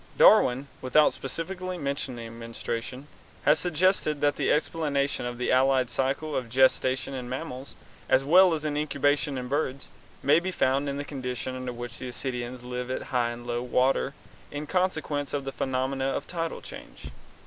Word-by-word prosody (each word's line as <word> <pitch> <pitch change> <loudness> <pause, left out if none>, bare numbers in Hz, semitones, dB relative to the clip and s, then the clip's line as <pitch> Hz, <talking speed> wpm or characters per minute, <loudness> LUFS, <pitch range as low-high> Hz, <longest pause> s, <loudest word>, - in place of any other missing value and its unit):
Darwin, 130 +3 +6
without 140 +4 +4
specifically 180 +6 -4
mentioning 130 -6 -4
menstruation, 115 +3 -5 0.4
has 150 +2 +5
suggested 175 -3 +2
that 145 0 +2
the - - +1
explanation 145 -5 0
of 120 0 -5
the 125 - 0
allied 130 -1 +3
cycle 135 +4 -1
of 125 -3 -2
gestation 130 +1 +3
in 125 -2 -5
mammals, 130 0 -6 0.3
as 130 - +4
well 175 +4 +6
as 155 -1 -5
incubation 145 -1 0
in 125 -1 -4
birds, 140 0 -2 0.3
may 150 +3 +5
be 180 +2 -3
found 140 -5 +1
in 140 - -3
the 145 - -4
condition 130 -2 -4
under 130 -1 -4
which 120 -1 -7
ascidians 125 -1 -4
live 125 0 -4
at 130 - -2
high 120 -2 +2
and 120 0 -7
low 120 0 -2
water 130 +3 +1 0.3
in 145 +1 -5
consequence 155 -5 -1
of 145 -1 -1
the 135 - -3
phenomena 130 +1 -1
of 135 +1 -1
tidal 165 -2 -4
change. - - -10
135 Hz, 160 wpm, -27 LUFS, 125-150 Hz, 0.4 s, Darwin